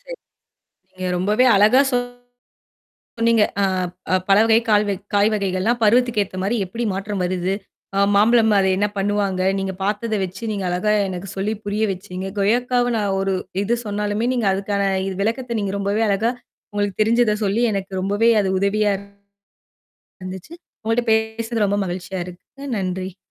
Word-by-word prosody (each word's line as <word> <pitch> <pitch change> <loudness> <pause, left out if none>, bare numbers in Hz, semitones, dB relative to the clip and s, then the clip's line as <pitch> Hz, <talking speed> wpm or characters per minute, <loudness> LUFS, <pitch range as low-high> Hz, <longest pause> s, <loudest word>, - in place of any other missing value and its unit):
சரி. - - -8 0.8
நீங்க 185 0 -4
ரொம்பவே 210 +7 +2
அழகா 215 +6 +6
சொன்னீங்க. 245 0 -4 1.2
அ, - - +4 0.5
அ, - - +5
பல 195 0 +6 0.3
கால் 210 -1 +4
வ - - +1 0.2
காய் 205 +1 +4
வகைகள்லாம் 200 +4 0
பருவத்துக்கேத்தமாரி 210 -3 +1
எப்பிடி 230 +6 -4
மாற்றம் 195 0 -3
வருது, 180 +1 -1 0.4
அ - - +3
மாம்பழம் 220 +1 +4
அத 195 - +3
என்ன 205 +2 +2
பண்ணுவாங்க, 200 -1 0 0.2
நீங்கப் 195 -1 -4
பார்த்தத 215 +2 -1
வச்சு, 185 +5 -8
நீங்க 200 -2 -3
அழகா 185 +4 +1 0.2
எனக்குச் 190 +1 -6
சொல்லிப் 205 +2 -2
புரிய 205 +2 -1
வச்சீங்க. 185 0 -6
கொய்யக்காவ 245 +4 +1 0.3
ஒரு 195 0 0 0.3
இது 235 +4 +1
சொன்னாலுமே 210 +2 -1
நீங்க 230 -5 +1
அதுக்கான 200 +1 -1 0.4
விளக்கத்த 235 +2 -1
நீங்க 200 -1 -2
ரொம்பவே 200 +2 0
அழகா 205 +4 +1 0.4
உங்களுக்குத் 205 -1 -2
தெரிஞ்சத 230 0 +3
சொல்லி 205 +4 +1
எனக்கு 195 -1 -3
ரொம்பவே 205 +4 +1
அது 190 - -1
உதவியா 205 +1 +2 1.3
இருந்துச்சு. 185 - -8 0.3
உங்கட்ட 225 +2 +1
பேசறது 220 0 0
ரொம்ப 205 +1 0
மகிழ்ச்சியா 180 +1 -4
இருக்குங்க. 180 +11 -11
நன்றி. 185 -1 -3
205 Hz, 140 wpm, -21 LUFS, 195-225 Hz, 1.3 s, அழகா